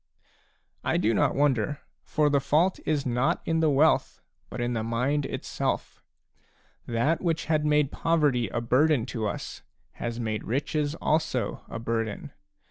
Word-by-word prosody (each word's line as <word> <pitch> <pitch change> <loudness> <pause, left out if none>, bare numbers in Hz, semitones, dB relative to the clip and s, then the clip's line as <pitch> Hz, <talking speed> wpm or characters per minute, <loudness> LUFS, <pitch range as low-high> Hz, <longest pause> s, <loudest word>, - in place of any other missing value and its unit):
I - - +1
do 110 +2 +2
not - - +2
wonder. 140 -1 +1 0.2
For 150 -1 +2
the 140 - +4
fault 160 +7 +2
is 150 -3 +1
not 125 +1 +1
in 165 0 +1
the 160 -1 +3
wealth, 150 +3 +3 0.3
but - - -7
in 120 0 -1
the 115 - -1
mind 130 +5 0
itself. - - -3 0.9
That 140 +8 +1
which 165 -3 0
had 155 -2 +1
made 150 -2 +3
poverty 145 -8 +1
a 120 - -2
burden 130 +1 +3
to 115 -4 -3
us, - - -5 0.3
has 120 0 -5
made 110 -2 -2
riches 145 +4 -1
also 155 -6 -1
a - - -5
burden. 115 -2 -3
140 Hz, 150 wpm, -27 LUFS, 115-150 Hz, 0.9 s, the